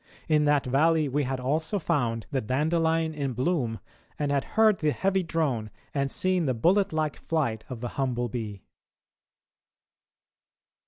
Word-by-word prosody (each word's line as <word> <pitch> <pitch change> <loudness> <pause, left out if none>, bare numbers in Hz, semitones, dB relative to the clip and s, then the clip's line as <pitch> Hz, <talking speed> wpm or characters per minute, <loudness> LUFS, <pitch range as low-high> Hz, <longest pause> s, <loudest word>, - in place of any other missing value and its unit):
In 150 -1 +3
that 145 -1 +3
valley 155 +4 +3
we 140 +1 0
had 130 0 -2
also 155 +9 -1
found 125 - -1
the 135 -3 0
dandelion 160 +6 +1
in 140 -4 -2
bloom 125 -3 -1 0.4
and 145 -2 -1
had 140 -1 +1
heard 220 -2 +5
the 155 - +2
heavy 190 +5 +1
drone 145 -11 -1 0.2
and 140 -1 0
seen 185 +1 +1
the 130 - +1
bullet 185 - +3
like 155 -2 -1
flight 135 -9 -1
of 125 -3 -6
the 120 - -3
humble 120 -2 0
bee." 110 -4 -5
145 Hz, 150 wpm, -27 LUFS, 125-165 Hz, 0.4 s, heard